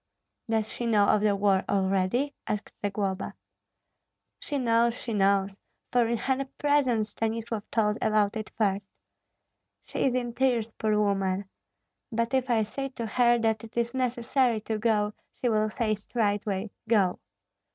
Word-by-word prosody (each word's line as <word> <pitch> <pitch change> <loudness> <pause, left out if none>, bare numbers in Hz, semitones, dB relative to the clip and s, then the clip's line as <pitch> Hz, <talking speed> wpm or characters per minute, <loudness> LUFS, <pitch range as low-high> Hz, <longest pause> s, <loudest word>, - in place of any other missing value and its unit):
"Does 220 -1 +1
she 240 - -4
know 210 -3 +4
of 210 - +4
the 210 -1 +3
war 195 -1 +2
already?" 195 +8 +1
asked 210 0 -3
Zagloba. 195 -2 -2 1.0
"She 290 - -3
knows, 235 -2 +3
she 235 - -5
knows, 195 -1 +2 0.3
for 245 -2 +3
in 235 0 0
her 265 +3 0
presence 260 -7 +2
Stanislav 225 0 -3
told 210 -1 +1
about 215 0 +2
it 215 -1 -4
first. 200 -2 +1 1.0
She - - -3
is 255 -2 +2
in 240 -2 -1
tears, 235 -4 +1
poor 215 -1 0
woman! 195 -1 +1 0.7
But 230 +2 -1
if 260 -1 +1
I 225 -2 +3
say 270 +6 -4
to 240 -3 -5
her 240 +1 +3
that 220 -1 +1
it 225 +1 -11
is 235 0 0
necessary 250 -1 +1
to 220 0 -3
go, 210 -2 +1 0.3
she 245 - +1
will 215 -1 +2
say 215 0 0
straightway. 205 -2 -1 0.2
Go!" 195 -6 +3
220 Hz, 150 wpm, -28 LUFS, 205-235 Hz, 1.0 s, know